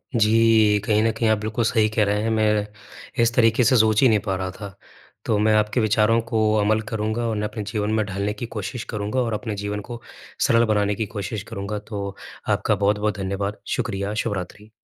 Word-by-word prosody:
जी। 110 Hz, -1 st, +4 dB
कहीं 105 Hz, -1 st, +2 dB
न 115 Hz, -, +2 dB
कहीं 115 Hz, -, +1 dB
आप 110 Hz, -, +3 dB
बिल्कुल 110 Hz, +2 st, -2 dB
सही 110 Hz, -1 st, +2 dB
कह 110 Hz, 0 st, +1 dB
रहे 105 Hz, +1 st, 0 dB
हैं। 115 Hz, -, 0 dB
मैं 105 Hz, -2 st, +1 dB, 0.6 s
इस 115 Hz, -, +2 dB
तरीके 115 Hz, +1 st, +4 dB
से 125 Hz, +2 st, +4 dB
सोच 110 Hz, -1 st, +4 dB
ही 135 Hz, -, +6 dB
नहीं 110 Hz, -, +3 dB
पा 95 Hz, -2 st, 0 dB
रहा 95 Hz, 0 st, -3 dB
था। 100 Hz, 0 st, -9 dB, 0.5 s
तो 110 Hz, -, +1 dB
मैं 110 Hz, +1 st, +3 dB
आपके 105 Hz, +3 st, +1 dB
विचारों 110 Hz, +1 st, +3 dB
को 110 Hz, -, +2 dB, 0.2 s
अमल 110 Hz, +1 st, +2 dB
करूँगा 110 Hz, +1 st, -2 dB
और 115 Hz, -, 0 dB
उन्हें 105 Hz, 0 st, -1 dB
अपने 105 Hz, -1 st, -5 dB
जीवन 105 Hz, -1 st, -1 dB
में 110 Hz, -1 st, +1 dB
ढालने 100 Hz, +1 st, -2 dB
की 110 Hz, +3 st, -6 dB
कोशिश 110 Hz, +4 st, -4 dB
करूँगा 105 Hz, +4 st, -2 dB
और 115 Hz, -2 st, -1 dB
अपने 110 Hz, 0 st, -3 dB
जीवन 105 Hz, 0 st, -3 dB
को 120 Hz, -1 st, -7 dB, 0.5 s
सरल 115 Hz, 0 st, +4 dB
बनाने 105 Hz, 0 st, +1 dB
की 110 Hz, -, -2 dB
कोशिश 100 Hz, +1 st, -4 dB
करूँगा। 100 Hz, +2 st, -4 dB
तो 100 Hz, -2 st, -6 dB, 0.3 s
आपका -, -, +1 dB
बहुत-बहुत 105 Hz, 0 st, 0 dB
धन्यवाद। 100 Hz, +1 st, -3 dB, 0.2 s
शुक्रिया, 100 Hz, +1 st, -2 dB
शुभरात्रि। 105 Hz, -1 st, -4 dB
105 Hz, 205 wpm, -23 LUFS, 105-110 Hz, 0.6 s, ही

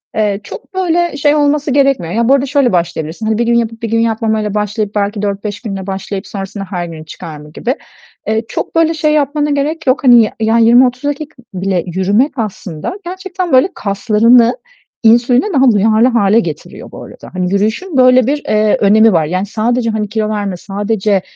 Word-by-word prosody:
Eee, 210 Hz, -2 st, 0 dB
çok 385 Hz, -, -11 dB
böyle 345 Hz, -4 st, 0 dB
şey 290 Hz, +1 st, +2 dB
olması 290 Hz, -1 st, +1 dB
gerekmiyor. 270 Hz, -, +1 dB
Ya, 235 Hz, +2 st, +1 dB
bu -, -, +6 dB
arada 275 Hz, 0 st, +2 dB
şöyle 275 Hz, -3 st, +1 dB
başlayabilirsin: 170 Hz, +2 st, -2 dB
Hani, 220 Hz, 0 st, 0 dB
1 235 Hz, -, 0 dB
gün 235 Hz, -, +1 dB
yapıp 230 Hz, -1 st, -1 dB
1 230 Hz, -, -3 dB
gün 230 Hz, -, +1 dB
yapmamayla 220 Hz, -2 st, -1 dB
başlayıp, 210 Hz, 0 st, -2 dB
belki 205 Hz, 0 st, -1 dB
4-5 205 Hz, 0 st, -4 dB
günle 195 Hz, -4 st, -6 dB
başlayıp 195 Hz, +1 st, -5 dB
sonrasında 195 Hz, 0 st, -6 dB
her 180 Hz, -3 st, -3 dB
güne 160 Hz, -2 st, -9 dB
çıkarma 150 Hz, -1 st, -10 dB
gibi. 245 Hz, -, -3 dB, 0.5 s
Eee, 220 Hz, +1 st, 0 dB
çok 225 Hz, -, -5 dB
böyle 330 Hz, 0 st, +3 dB
şey 305 Hz, -1 st, 0 dB
yapmana 295 Hz, 0 st, 0 dB
gerek 295 Hz, +2 st, -2 dB
yok. 255 Hz, +3 st, +2 dB
Hani, 240 Hz, -3 st, +7 dB
y 215 Hz, -, -2 dB
ya 225 Hz, +1 st, +2 dB
20-30 245 Hz, +3 st, +4 dB
dakika 290 Hz, +1 st, -4 dB, 0.2 s
bile 185 Hz, -2 st, -1 dB
yürümek 195 Hz, -, +1 dB
aslında 200 Hz, -, -5 dB
gerçekten 370 Hz, -1 st, -5 dB
böyle 260 Hz, +8 st, +5 dB
kaslarını 225 Hz, -, +3 dB, 0.5 s
insüline 240 Hz, +3 st, +4 dB
daha 265 Hz, -3 st, +4 dB
duyarlı 220 Hz, +3 st, +3 dB
hâle 225 Hz, -3 st, +3 dB
getiriyor 160 Hz, -8 st, -6 dB
bu -, -, -10 dB
arada. -, -, -12 dB
Hani 180 Hz, 0 st, -2 dB
yürüyüşün 220 Hz, -, -1 dB
böyle 255 Hz, -1 st, +5 dB
bir, 290 Hz, +1 st, -1 dB
eee, 215 Hz, 0 st, +2 dB
önemi 220 Hz, +1 st, +4 dB
var. 160 Hz, -2 st, +2 dB
Yani 185 Hz, +5 st, -2 dB
sadece 230 Hz, +3 st, -1 dB
hani 215 Hz, -2 st, -2 dB
kilo 220 Hz, -1 st, -2 dB
verme, 205 Hz, -3 st, -3 dB
sadece 205 Hz, +1 st, -1 dB
220 Hz, 185 wpm, -14 LUFS, 200-260 Hz, 0.5 s, Hani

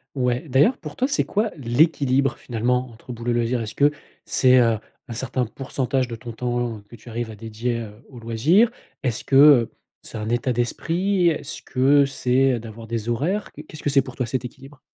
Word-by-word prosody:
Ouais, 125 Hz, +2 st, -1 dB
d'ailleurs 145 Hz, -, +3 dB
pour 150 Hz, -1 st, -9 dB
toi 260 Hz, -, +1 dB
c'est 285 Hz, -, 0 dB
quoi 215 Hz, +2 st, 0 dB
l'équilibre 135 Hz, 0 st, +2 dB
finalement 125 Hz, +2 st, -1 dB
entre 115 Hz, +2 st, -11 dB
boulot 120 Hz, +1 st, -4 dB
et -, -, +1 dB
loisir? 120 Hz, +1 st, 0 dB
Est-ce 110 Hz, 0 st, -5 dB
que 145 Hz, +1 st, +3 dB, 0.3 s
c'est, 130 Hz, -1 st, +4 dB
heu, 115 Hz, -3 st, +3 dB, 0.3 s
un -, -, -8 dB
certain 125 Hz, +1 st, -1 dB
pourcentage 130 Hz, +1 st, -2 dB
de 115 Hz, -, -5 dB
ton 115 Hz, +1 st, -8 dB
temps 120 Hz, -1 st, -2 dB
que 120 Hz, -, -12 dB
tu 115 Hz, -, -16 dB
arrives 115 Hz, 0 st, -4 dB
à 110 Hz, -, -9 dB
dédier, 115 Hz, +2 st, -3 dB
heu, 110 Hz, -2 st, -7 dB, 0.2 s
aux 130 Hz, -, -12 dB
loisirs? 135 Hz, -, +3 dB, 0.3 s
Est-ce 120 Hz, -5 st, -2 dB
que, 135 Hz, -, 0 dB
heu, 140 Hz, -5 st, +7 dB, 0.3 s
c'est -, -, -10 dB
un 105 Hz, +1 st, -4 dB
état 125 Hz, +2 st, 0 dB
d'esprit? 175 Hz, -, +1 dB
Est-ce 155 Hz, -, -3 dB
que 140 Hz, +2 st, +3 dB
c'est 130 Hz, -1 st, +1 dB
d'avoir 115 Hz, 0 st, -10 dB
des 115 Hz, 0 st, -4 dB
horaires? 175 Hz, -, -1 dB
Qu'est-ce 155 Hz, +1 st, -11 dB
que 145 Hz, -, 0 dB
c'est 135 Hz, -1 st, +4 dB
pour 130 Hz, -1 st, -10 dB
toi 125 Hz, -, -1 dB
cet 125 Hz, +1 st, -3 dB
équilibre? 135 Hz, +3 st, -14 dB
125 Hz, 200 wpm, -23 LUFS, 115-140 Hz, 0.3 s, heu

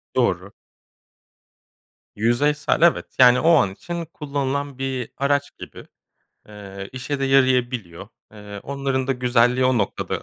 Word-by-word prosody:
Doğru. -, -, 0 dB, 1.6 s
Yüzeysel, 145 Hz, +8 st, +1 dB
evet. 170 Hz, -1 st, +4 dB
Yani, 125 Hz, -1 st, +7 dB
o 165 Hz, -, +2 dB
an 95 Hz, -11 st, +2 dB
için 170 Hz, -, -6 dB
kullanılan 140 Hz, -3 st, -4 dB
bir 130 Hz, -3 st, -4 dB
araç 140 Hz, +1 st, -1 dB
gibi. -, -, -11 dB, 0.6 s
Eee, 100 Hz, -2 st, -9 dB
işe 130 Hz, +2 st, -4 dB
de 135 Hz, -, +1 dB
yarayabiliyor. 125 Hz, -9 st, +1 dB, 0.2 s
Eee, 105 Hz, -1 st, -10 dB
onların 135 Hz, -1 st, -2 dB
da 135 Hz, -, +1 dB
güzelliği 125 Hz, 0 st, +2 dB
o 130 Hz, -2 st, +2 dB
noktada. 100 Hz, -, -3 dB
130 Hz, 125 wpm, -22 LUFS, 115-140 Hz, 1.6 s, Yani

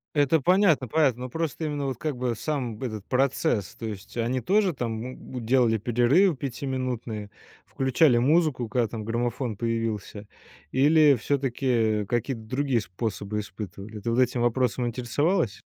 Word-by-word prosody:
Это 145 Hz, +2 st, +3 dB
понятно 175 Hz, -, +3 dB
понятно. 130 Hz, -3 st, +2 dB
Ну. 130 Hz, -, -5 dB
Просто 160 Hz, +1 st, -3 dB
именно 145 Hz, -2 st, -2 dB
вот, 130 Hz, -3 st, -3 dB
как 150 Hz, -2 st, -3 dB
бы, 125 Hz, -1 st, -1 dB
сам 125 Hz, -6 st, -3 dB
этот 110 Hz, -5 st, -5 dB
процесс. 130 Hz, -, 0 dB
То 115 Hz, -, -7 dB
есть 105 Hz, -2 st, -7 dB
они 120 Hz, +2 st, 0 dB
тоже 195 Hz, -, +2 dB
там 115 Hz, -4 st, -3 dB
м, 125 Hz, -1 st, -7 dB
делали 120 Hz, -2 st, +3 dB
перерывы 125 Hz, -, +3 dB
пятиминутные, 125 Hz, -5 st, -4 dB, 0.4 s
включали 130 Hz, 0 st, +3 dB
музыку, 140 Hz, -2 st, +2 dB
когда 120 Hz, 0 st, +1 dB
там 110 Hz, 0 st, -6 dB
граммофон 120 Hz, 0 st, -2 dB
появился? 115 Hz, -3 st, -3 dB, 0.5 s
Или 150 Hz, +1 st, +5 dB
всё-таки, 135 Hz, 0 st, -1 dB
э, 110 Hz, -4 st, +2 dB
какие-то 120 Hz, +2 st, -2 dB
другие 130 Hz, +2 st, 0 dB
способы 105 Hz, +1 st, -4 dB
испытывали? 100 Hz, +1 st, -8 dB
Ты 110 Hz, +3 st, -3 dB
вот 115 Hz, -, +1 dB
этим 125 Hz, -1 st, +2 dB
вопросом 120 Hz, 0 st, +1 dB
интересовалась? 125 Hz, -, 0 dB
125 Hz, 150 wpm, -26 LUFS, 110-140 Hz, 0.5 s, Или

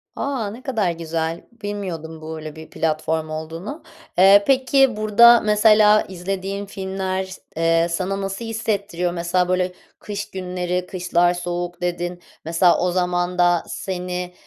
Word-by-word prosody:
A. 260 Hz, -7 st, -2 dB
Ne 235 Hz, +4 st, -10 dB
kadar 220 Hz, -10 st, 0 dB
güzel, 165 Hz, 0 st, -3 dB
bilmiyordum 190 Hz, -8 st, -6 dB
böyle 155 Hz, -1 st, -7 dB
bir 160 Hz, 0 st, -11 dB
platform 155 Hz, 0 st, -1 dB
olduğunu. 165 Hz, -, -6 dB, 0.3 s
Eee, 195 Hz, +2 st, +7 dB
peki, 265 Hz, -1 st, +3 dB
burada 230 Hz, +3 st, +7 dB
mesela 210 Hz, 0 st, +5 dB
izlediğin 195 Hz, +2 st, -4 dB
filmler 190 Hz, -1 st, -3 dB
s 190 Hz, 0 st, -10 dB, 0.2 s
eee, 165 Hz, 0 st, +3 dB
sana 190 Hz, +3 st, -2 dB
nasıl 195 Hz, +4 st, -4 dB
hissettiriyor? 205 Hz, -6 st, -2 dB
Mesela, 175 Hz, +1 st, 0 dB
böyle, 185 Hz, 0 st, +1 dB, 0.3 s
kış 205 Hz, -1 st, -6 dB
günleri, 180 Hz, -1 st, -3 dB
"Kışlar 175 Hz, -1 st, +1 dB
soğuk." 175 Hz, 0 st, -4 dB
dedin. 175 Hz, 0 st, -3 dB, 0.2 s
Mesela 170 Hz, +2 st, +4 dB
o 180 Hz, 0 st, +1 dB
zaman 180 Hz, 0 st, 0 dB
da 175 Hz, -1 st, +3 dB
seni, 180 Hz, -1 st, -4 dB
180 Hz, 135 wpm, -21 LUFS, 175-205 Hz, 0.3 s, Eee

